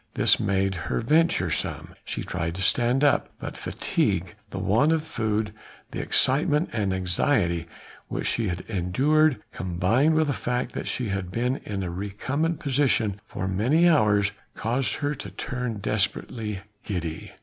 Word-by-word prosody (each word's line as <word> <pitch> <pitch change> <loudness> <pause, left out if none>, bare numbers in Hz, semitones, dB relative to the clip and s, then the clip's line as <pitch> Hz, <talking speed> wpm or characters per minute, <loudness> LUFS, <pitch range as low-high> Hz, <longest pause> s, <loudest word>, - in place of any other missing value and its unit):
This - - +4
made 95 0 +1 0.2
her - - 0
venturesome. 150 - +1
She - - -4
tried 80 +1 -3
to 95 - -2
stand 120 +7 +3
up; 145 - +3
but - - -6
fatigue, - - -1 0.2
the - - -6
want 120 +10 +3
of 160 -1 +1
food, 110 -6 -1 0.4
the - - -4
excitement 150 +4 +2
and 105 -4 0
anxiety 90 - +1 0.4
which - - -3
she 115 -2 +1
had 90 -1 -2
endured, 130 - +2
combined 95 - +1
with 160 0 +4
the 140 - 0
fact 125 0 -2
that - - -4
she 125 -4 -1
had 95 -2 -2
been 125 +7 0
in 100 -7 -4
a 90 - -3
recumbent 130 - -2
position 125 -8 +1
for 95 - -4
many 125 - +3
hours, 105 -10 +4 0.2
caused 125 +4 0
her 145 -1 -1
to 105 -8 -7
turn 125 +5 -4
desperately 105 0 -2 0.2
giddy. 85 -5 -4
110 Hz, 150 wpm, -26 LUFS, 95-140 Hz, 0.4 s, This